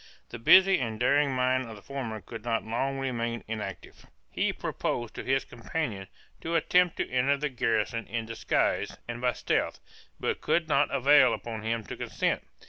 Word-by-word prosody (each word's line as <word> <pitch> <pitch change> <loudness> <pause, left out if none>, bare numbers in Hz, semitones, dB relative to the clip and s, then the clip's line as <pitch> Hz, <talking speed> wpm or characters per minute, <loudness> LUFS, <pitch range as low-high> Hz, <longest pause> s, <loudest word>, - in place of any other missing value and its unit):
The 120 - -7
busy 190 +10 +7
and 110 -3 -3
daring 140 +3 +3
mind 130 -1 +1
of 110 - -8
the 100 - -13
former 120 -6 -5
could 110 +4 -9
not 115 -1 -1
long 135 +5 -1
remain 120 -3 -2
inactive; 105 -4 -7 0.2
he - - 0
proposed 120 -2 -3
to - - -6
his 135 +1 +1
companion 115 -6 -4 0.3
to 165 +1 -2
attempt 180 +2 +3
to - - -1
enter 130 +3 +2
the 150 +1 -2
garrison 115 -2 -1
in 115 -1 -3
disguise 115 +1 0
and 120 0 -5
by 125 0 +2
stealth, - - -1 0.4
but - - -2
could 170 -2 +1
not 145 -1 +3
prevail 140 +2 +5
upon 115 -2 -6
him 115 +1 -2
to - - -7
consent. - - -1
120 Hz, 175 wpm, -28 LUFS, 115-140 Hz, 0.4 s, busy